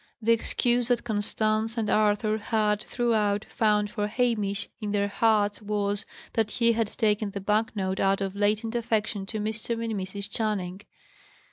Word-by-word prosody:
The 230 0 +2
excuse 240 +1 +1
that 245 -1 +1
Constance 215 +1 0
and 220 -2 0
Arthur 215 +1 +2
had, 210 -1 +1
throughout, 215 -4 0
found 210 -2 +1
for 210 -2 -1
Hamish 210 -3 0
in 210 -2 -3
their 200 0 +1
hearts 210 -1 +2
was, 205 -1 -1 0.3
that 220 -2 +1
he 235 +1 +2
had 230 -1 +1
taken 210 -1 0
the 200 - -5
bank 210 +3 0
note 190 -1 -1
out 195 0 +3
of 195 -1 -3
latent 210 +2 +1
affection 215 -4 -1
to 215 +1 -3
Mr. 220 +2 -2
and 225 -1 -2
Mrs. 200 0 -4
Channing. 200 -4 -2
215 Hz, 160 wpm, -27 LUFS, 205-225 Hz, 0.3 s, out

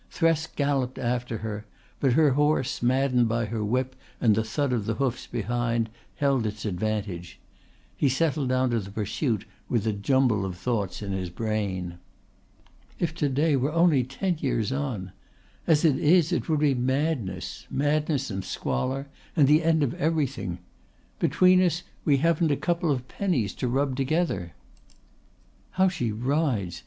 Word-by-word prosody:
Thresk 165 -1 +1
galloped 140 -3 0
after 120 -1 -2
her, 105 0 -5 0.3
but 135 -3 +3
her 150 0 +5
horse, 145 -1 +1
maddened 125 -1 +2
by 115 0 0
her 110 0 -3
whip 130 +4 -1 0.2
and 115 -4 +4
the 110 +2 +1
thud 130 +4 -1
of 110 -4 -1
the 110 - 0
hoofs 130 0 -2
behind, 115 0 -1 0.2
held 135 -6 +1
its 105 +1 -5
advantage. 100 -3 -3 0.6
He 140 - +2
settled 145 0 0
down 130 0 +2
to 115 - +1
the 100 -2 -7
pursuit 105 +2 -2 0.2
with 115 -3 0
a 110 - +1
jumble 110 0 +2
of 95 -2 -4
thoughts 105 -2 -2
in 100 - -4
his 95 -2 -2
brain. 95 -3 -3 1.0
"If 165 -2 -1
to 155 -4 0
day 145 +3 +2
were 135 +3 0
only 165 -5 +4
ten 170 +8 -2
years 120 -5 0
on... 130 -10 -3 0.6
As 160 0 +4
it 145 -5 +3
is 165 +1 +4
it - - -1
would 155 -2 +2
be 145 -2 +4
madness... 130 - -2
madness 145 -2 0
and 95 -1 -3
squalor 130 - -2 0.3
and 145 -5 +5
the 155 +3 +5
end 160 -1 +3
of 125 - 0
everything... 145 - 0 0.6
Between 185 0 +4
us 175 -1 +1 0.2
we 145 -3 +4
haven't 165 +2 +2
a 145 - +1
couple 170 -1 0
of 130 -3 -1
pennies 140 - -1
to 125 - -3
rub 135 +2 0
together... 135 - -1 1.2
How 190 0 +4
she 150 - -2
rides! 120 - -1
130 Hz, 160 wpm, -26 LUFS, 110-150 Hz, 1.2 s, her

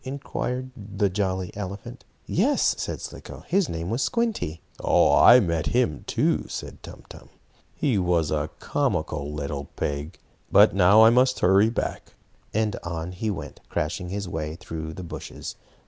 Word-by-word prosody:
inquired 130 -1 -4
the 100 -2 -2
jolly 95 -2 -2
elephant. 100 0 -7 0.2
"Yes," - - +2
said - - -3
Slicko, - - -9
"his 190 -1 +2
name 85 +3 -4
was 120 +4 0
Squinty." 225 - -1 0.2
"I 125 - +7
met 85 -7 0
him, 120 - 0
too," - - +1
said - - -7
Tum - - -11
Tum. - - -13 0.5
"He 130 -9 +1
was 85 -4 +1
a 75 0 -1
comical 80 - -1
little 70 -1 -4
pig. 75 +4 -3 0.3
But - - +7
now 100 +3 +6
I 110 - +8
must 130 +1 +3
hurry 95 +4 +5
back," 115 - -4 0.4
and 110 -1 0
on 85 0 -4
he 100 +4 -3
went, 95 -5 -6
crashing 90 +4 -2
his 100 0 -4
way 80 -2 -4
through 80 -2 -6
the 90 - -7
bushes. 85 - -7
95 Hz, 150 wpm, -25 LUFS, 80-110 Hz, 0.5 s, I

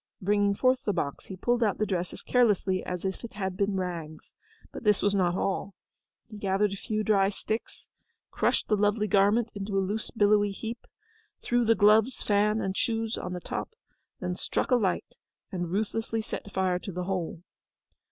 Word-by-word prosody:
Bringing 205 +1 +2
forth 255 +3 +2
the 205 - 0
box, 140 -5 -3
he 190 - -6
pulled 240 +6 0
out 210 -4 +2
the 215 - +1
dress 180 -3 -2
as - - -10
carelessly 205 -6 +2
as 180 0 -4
if 190 +4 -3
it 235 - -7
had 190 -3 -3
been 200 +1 0
rags. 165 -4 -5 0.4
But - - -8
this 210 -2 +3
was 205 - +3
not 180 -3 +2
all. 195 0 -2 0.5
He 215 - -10
gathered 195 +1 +1
a - - -3
few 215 +2 -2
dry 195 -3 +3
sticks, 215 +2 -5 0.4
crushed - - +1
the 215 - +3
lovely 210 +1 +2
garment 205 +4 +3
into 200 0 -3
a 190 -1 +1
loose 215 +2 -2
billowy 205 -2 +3
heap, 225 +3 -6 0.6
threw 240 0 +2
the 225 0 +4
gloves, 220 +4 +4
fan, 210 +1 +2
and 190 0 -2
shoes 225 -1 0
on 180 - -5
the 180 - -4
top, 450 - -5 0.4
then 180 -1 -2
struck 195 - -2
a - - +7
light 195 -7 -1 0.3
and 175 -2 -3
ruthlessly 220 +2 -1
set 205 - -6
fire 185 -2 +1
to 195 - -6
the 180 0 -3
whole. 180 -2 -3
205 Hz, 190 wpm, -28 LUFS, 190-215 Hz, 0.6 s, a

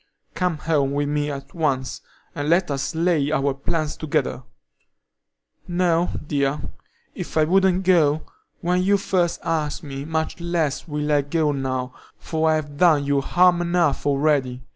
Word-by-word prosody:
Come 180 -3 -1
home 145 -3 0
with 145 0 0
me 150 0 -1
at 140 -1 -7
once, 135 -5 -1 0.3
and 145 +1 -3
let 175 -1 +3
us 135 +2 -2
lay 160 -4 +1
our 140 -2 +1
plans 155 +2 -2
together." 150 -4 -1 1.3
"No, 175 -1 +1 0.2
dear; 140 -1 0 0.5
if - - -6
I 155 - +5
wouldn't 190 +2 +3
go 160 -5 +3 0.4
when 180 0 +1
you 200 +2 +3
first 180 -3 0
asked 155 0 -2
me, 140 -2 -6
much 160 +2 -2
less 170 -4 -1
will 150 -1 -2
I 145 -1 +4
go 150 +2 0
now, 130 -2 -3 0.2
for 160 0 -1
I've 150 -2 -1
done 155 -4 +4
you 140 0 +1
harm 175 +3 +3
enough 170 -5 +1
already. 140 -3 +1
155 Hz, 150 wpm, -23 LUFS, 140-170 Hz, 1.3 s, I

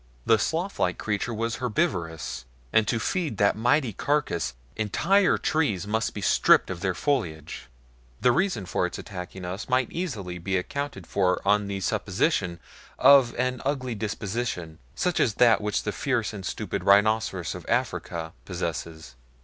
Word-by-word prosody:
The 115 - +5
sloth 170 - -2
like 90 - +1
creature 105 +2 -2
was 115 +1 -2
herbivorous, 80 - -2 0.3
and 110 -2 +4
to 115 - +1
feed 155 - -1
that 100 -1 +3
mighty 120 +2 +2
carcass 120 - -1 0.2
entire 175 - +2
trees 110 - 0
must 110 +2 -1
be 105 - -4
stripped - - +4
of 90 - -5
their 95 -1 -1
foliage. 85 - -2 0.5
The 125 - +4
reason 160 - 0
for - - 0
its - - -7
attacking 90 -1 -7
us 95 +7 -5
might 130 -1 +1
easily 105 - -4
be 95 +2 -1
accounted 140 - -4
for 90 +1 +1
on 105 0 +3
the 100 -1 -4
supposition 95 - 0 0.4
of 135 -2 +6
an 125 0 -1
ugly 130 -3 -1
disposition 105 -5 -4 0.2
such 180 -1 0
as 110 -5 +2
that 115 -4 +5
which 105 -2 -1
the - - -1
fierce - - -1
and - - -7
stupid - - -3
rhinoceros 100 -3 +3
of - - -8
Africa 80 -1 -2
possesses. 80 -2 -5
105 Hz, 155 wpm, -26 LUFS, 90-125 Hz, 0.5 s, of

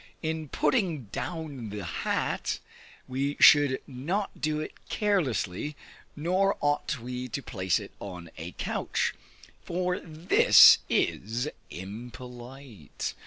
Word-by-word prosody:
In 160 -2 -3
putting 175 - +1
down 150 -9 -5
the 105 0 -5
hat, 85 -2 -1 0.5
we 135 +2 -2
should 145 -3 +7
not 165 +11 -3
do 155 0 0
it 155 - -5 0.2
carelessly, 150 - 0 0.4
nor 185 +6 +1
ought 145 -2 0
we 125 +2 -5
to 130 +3 -5
place 95 -6 0
it - - -9
on 90 -4 -8
a 85 +2 -7
couch, - - -1 0.5
for 180 +1 -1
this 160 +1 +7
is 115 +7 0 0.2
impolite. 120 - -8
135 Hz, 110 wpm, -28 LUFS, 115-160 Hz, 0.5 s, should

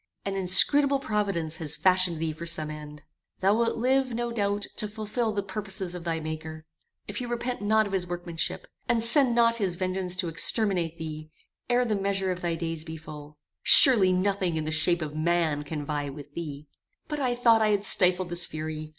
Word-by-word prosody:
An 195 - -3
inscrutable 275 +10 +5
providence 200 - -3
has 155 -3 -1
fashioned 185 -2 +2
thee 160 0 -3
for 170 +2 -9
some 155 -2 0
end. 150 -1 -11 0.4
Thou 195 +2 +2
wilt 230 +1 0
live, 260 0 0
no 240 0 -3
doubt, 205 -2 -2
to 210 - 0
fulfil 215 +2 -3
the 205 -1 -3
purposes 190 -2 -4
of 175 -1 -8
thy 165 -1 -2
maker, 155 0 -7 0.4
if 205 - -7
he 245 - -5
repent 240 0 -4
not 215 +1 +2
of 200 - -7
his 180 -2 -2
workmanship, 175 -2 -5 0.2
and 235 -2 +2
send 245 0 +3
not 230 -1 +3
his 190 -5 -2
vengeance 185 0 -2
to 180 -1 -3
exterminate 170 0 0
thee, 155 -1 -8 0.4
ere 245 0 +2
the 220 -3 -1
measure 195 -1 -1
of 180 0 -6
thy 170 -1 -2
days 165 -1 -5
be 160 0 -8
full. 150 -1 -12 0.2
Surely 215 -9 +9
nothing 185 -2 -1
in 155 - -3
the 155 - -3
shape 160 +1 +1
of 150 -1 -7
man 160 -2 0
can 150 0 -6
vie 145 -1 -4
with 145 +1 -12
thee! 150 -3 -7 0.4
"But 300 -1 -5
I 250 -3 -1
thought 230 -2 +3
I 215 - +2
had 205 -1 0
stifled 185 -1 +2
this 175 +1 -3
fury. 155 -1 -7
185 Hz, 200 wpm, -26 LUFS, 160-215 Hz, 0.4 s, Surely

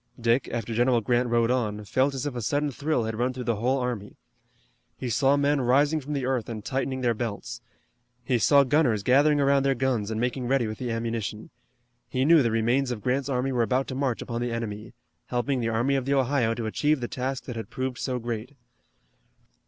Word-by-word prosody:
Dick, 120 +2 +2
after 115 -1 -3
General 120 +1 +3
Grant 120 +2 +1
rode 115 0 +2
on, 105 -4 -1
felt 130 +6 +1
as 135 +1 -3
if 145 - -2
a 120 - -3
sudden 145 +6 0
thrill 145 -1 -1
had 110 0 -4
run 125 +1 0
through 125 0 -5
the 115 -3 -1
whole 125 +5 +1
army. 125 -5 -4 0.8
He 125 - -4
saw 135 +4 +3
men 145 0 +2
rising 145 +5 +3
from 145 +2 -5
the 135 -3 -2
earth 125 -4 -1
and 110 -2 -6
tightening 130 0 -2
their 120 -2 +2
belts. 105 - -5 0.6
He 120 0 +1
saw 140 +5 +5
gunners 130 -7 +2
gathering 145 +5 +4
around 140 0 +3
their 135 0 +1
guns 120 -5 0
and 110 0 -2
making 125 +1 -1
ready 130 -2 +2
with 110 0 -5
the 125 - -3
ammunition. 115 -2 -3 0.6
He 130 +1 0
knew 165 0 +6
the 120 - +2
remains 120 +4 +1
of 115 -4 -4
Grant's 135 +2 0
army 130 0 0
were 125 -2 +1
about 130 +3 +1
to - - -4
march 130 -3 -1
upon 115 -1 -4
the 120 0 -2
enemy, 110 -1 -5 0.3
helping 125 +2 -1
the 115 -1 -1
Army 120 +5 +1
of 135 -2 -1
the 140 +1 +1
Ohio 130 -4 +1
to 115 - -4
achieve 145 +7 +1
the 120 - -3
task 130 +1 -3
that 125 - -7
had 115 - -6
proved 130 -1 -4
so 130 -2 -2
great. 120 +2 -5
125 Hz, 215 wpm, -26 LUFS, 115-135 Hz, 0.8 s, knew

